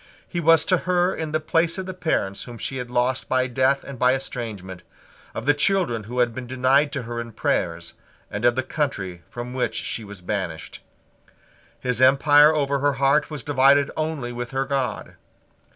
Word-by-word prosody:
He 175 - -4
was 165 0 +5
to 185 - +3
her 180 +1 +1
in 160 -1 -4
the 155 - +1
place 165 +2 +1
of 190 - -4
the 185 - -5
parents 160 - -2
whom 120 -1 -9
she 135 - -4
had 125 -1 -5
lost 125 +1 0
by 130 0 +2
death 130 +2 +1
and 135 -3 -9
by 125 +1 +4
estrangement, 105 -9 -5 0.5
of 115 - -5
the 145 - +5
children 145 - +1
who 120 +3 -7
had 120 -2 +2
been 125 +1 -7
denied 130 +3 +2
to 140 -4 -3
her 120 0 -4
prayers, 85 -6 -2 0.4
and 100 +2 -4
of 120 0 +4
the 130 - 0
country 100 - -3
from 120 +1 -7
which 130 - -1
she 115 - -3
was 100 -3 -10
banished. 90 -5 -5 1.0
His 125 -1 -1
empire 145 +3 +6
over 140 -2 0
her 145 +1 +2
heart 140 +3 +2
was 150 -5 -6
divided 140 0 +4
only 155 -6 -3
with 120 0 -5
her 135 0 -1
God. 135 -2 -3
130 Hz, 185 wpm, -23 LUFS, 120-145 Hz, 1.0 s, empire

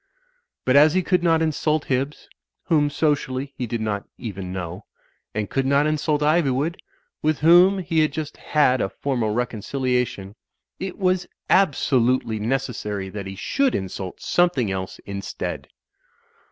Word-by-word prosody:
But 130 - +3
as 150 +3 +6
he 185 - +2
could 180 0 +2
not 165 -2 +3
insult 155 -1 0
Hibbs, 135 +3 -2 0.4
whom 150 -3 +2
socially 140 -2 -1
he 125 - -3
did 115 0 -3
not 105 -2 -2
even 95 -6 -6
know; 90 -2 -6 0.5
and 105 -1 -1
could 135 +4 -1
not 140 +2 +3
insult 150 -1 0
Ivy 155 -1 +3
wood, 145 +7 -1 0.4
with 155 -1 +1
whom 175 +5 +6
he 170 -3 0
had 155 -1 +3
just 155 0 -5
had 130 -5 +2
a - - 0
formal 125 -4 -2
reconciliation, 125 -2 -2 0.5
it 190 -1 -5
was 185 -2 +1 0.2
abso 145 -8 +3
lutely 115 -3 +1
necessary 110 -5 -2
that 100 0 -6
he 95 - -6
should 275 - 0
insult 95 -1 -5
something 170 - +2
else 95 -1 -4
instead. 100 0 -5
135 Hz, 150 wpm, -23 LUFS, 110-155 Hz, 0.5 s, as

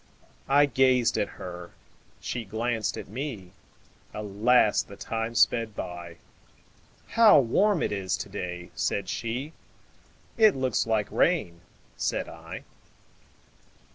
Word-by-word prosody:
I 145 +1 +6
gazed 130 -3 +3
at - - 0
her, 90 -1 -8 0.4
she 120 - -4
glanced 110 +1 -2
at - - -7
me; 110 -5 -6 0.6
Alas! 105 +2 +3
the 100 - -11
time 115 +3 -4
sped 115 -1 +2
by:"How 90 - 0
warm 185 - +2
it - - -1
is 95 -1 -1
to 100 - -6
day!" 90 -3 -6
said 100 -2 -1
she;"It 150 - -2
looks 130 -4 0
like 110 -2 0
rain," 90 - +1 0.4
said - - -1
I. - - -9
115 Hz, 110 wpm, -27 LUFS, 100-130 Hz, 0.6 s, I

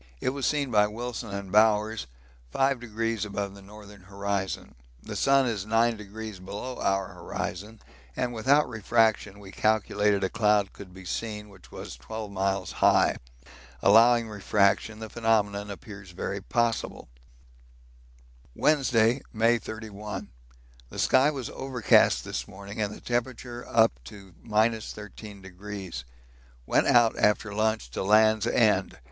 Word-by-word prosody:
It - - 0
was 135 0 -2
seen 145 -4 0
by 105 -2 +4
Wilson 115 +1 -5
and 100 -1 -6
Bowers 105 - +3 0.5
5° 115 -5 0
above 100 -1 -4
the 100 - -13
northern 105 0 -13
horizon 100 0 -4 0.3
the - - -7
sun 135 -1 +3
is 110 -6 -2
9° 110 -3 -1
below 105 +7 -6
our 95 -1 0
horizon, 105 +5 -6 0.4
and 120 -1 -2
without 135 +6 +3
refraction 110 -2 +1
we 100 -1 -11
calculate 105 -2 +1
a - - +2
cloud 105 -1 +2
could 95 -2 -11
be 95 0 -12
seen 105 +2 -4
which 95 -3 -17
was - - -8
12 105 - -7
miles 95 -1 -1
high. - - +3 0.7
Allowing 115 +2 +6
refraction 105 +1 +1
the 110 0 -7
phenomenon 105 -3 0
appears 100 -1 -10
very 95 +3 -4
possible. 115 - -1 1.5
Wednesday, 130 -4 +3
May 115 +1 +3
31. 105 -1 -7 0.6
The - - -10
sky 130 +3 +4
was 135 -5 -5
overcast 130 -4 +3
this - - -4
morning 100 +3 -8
and 105 -1 -1
the - - -10
temperature 120 0 -3
up 110 0 +5
to 95 +3 -12
13°. 105 - -3 0.6
Went - - +2
out 120 -2 +4
after 105 0 +2
lunch 110 - 0
to - - -4
'Land's 110 +2 +4
End.' 115 -3 +2
105 Hz, 130 wpm, -27 LUFS, 100-115 Hz, 1.5 s, Allowing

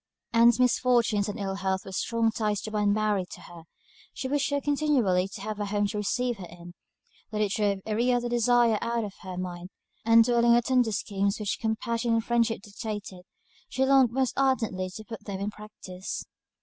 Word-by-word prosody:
Ann's 235 +1 +5
misfortunes 240 -4 +2
and 205 - -5
ill 195 -1 -2
health 190 -1 -2
were 195 - -8
strong 230 +3 0
ties 210 -2 -1
to 215 - -6
bind 210 -1 +1
Mary 210 -2 +1
to - - -11
her; 170 -2 -13 0.5
she 260 - -4
wished 285 +2 0
so 285 0 0
continually 275 -11 +1
to 195 - -10
have 215 0 -5
a 205 - -1
home 205 0 0
to 210 - -4
receive 240 +2 -1
her 180 - -7
in, 175 0 -12 0.6
that 215 - -4
it 210 -2 +1
drove 200 -2 0
every 230 +3 +1
other 245 0 +1
desire 240 -2 +3
out 235 0 -1
of 205 -2 -6
her 185 -2 -7
mind; 180 0 -5 0.3
and, 230 0 +6
dwelling 235 0 +2
on 235 0 +6
the 240 - +4
tender 250 -2 +2
schemes 200 -1 -1
which 210 -2 -2
compassion 230 +1 -1
and 225 0 +1
friendship 230 -3 +1
dictated, 205 -3 -6 0.5
she 265 - +1
longed 265 -2 +5
most 260 0 0
ardently 225 -9 0
to 215 +4 -9
put 225 0 -9
them 195 -2 -5
in 200 +1 -3
practice. 200 -3 -8
215 Hz, 200 wpm, -27 LUFS, 200-240 Hz, 0.6 s, and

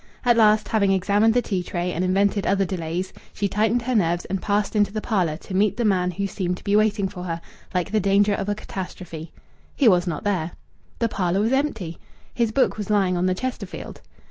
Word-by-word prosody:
At 240 -1 +5
last, 215 -1 +4
having 200 -3 +2
examined 205 +4 +3
the 245 - +3
tea 190 -4 -1
tray 175 0 -3
and 175 - -1
invented 195 +2 +1
other 195 0 +2
delays, 175 0 -3 0.2
she 205 - 0
tightened 220 +4 +1
her 255 +2 -1
nerves 175 -5 +1
and 190 0 -3
passed 205 +1 0
into 205 -1 +3
the 215 - -2
parlour 185 -9 0
to 190 - -10
meet 200 +2 +2
the 240 - 0
man 185 -3 +2
who 200 +3 -2
seemed 180 -2 -2
to - - -15
be 200 - +1
waiting 210 -2 +2
for 180 -1 -8
her 165 -1 -3 0.3
like 180 +2 -1
the 215 - +2
danger 200 +1 +3
of 200 0 -2
a 205 - 0
catastrophe. 180 -5 -7 0.4
He 275 - +3
was 180 -3 +4
not 160 -4 -3
there. 180 -5 -1 0.4
The 230 - +1
parlour 190 -2 0
was 225 +4 +1
empty. 225 - -1 0.3
His 230 -2 +1
book 260 0 +2
was 210 - -4
lying 195 -3 +2
on 180 +1 +1
the 185 - +1
Chesterfield. 255 +6 -6
200 Hz, 220 wpm, -23 LUFS, 180-215 Hz, 0.4 s, At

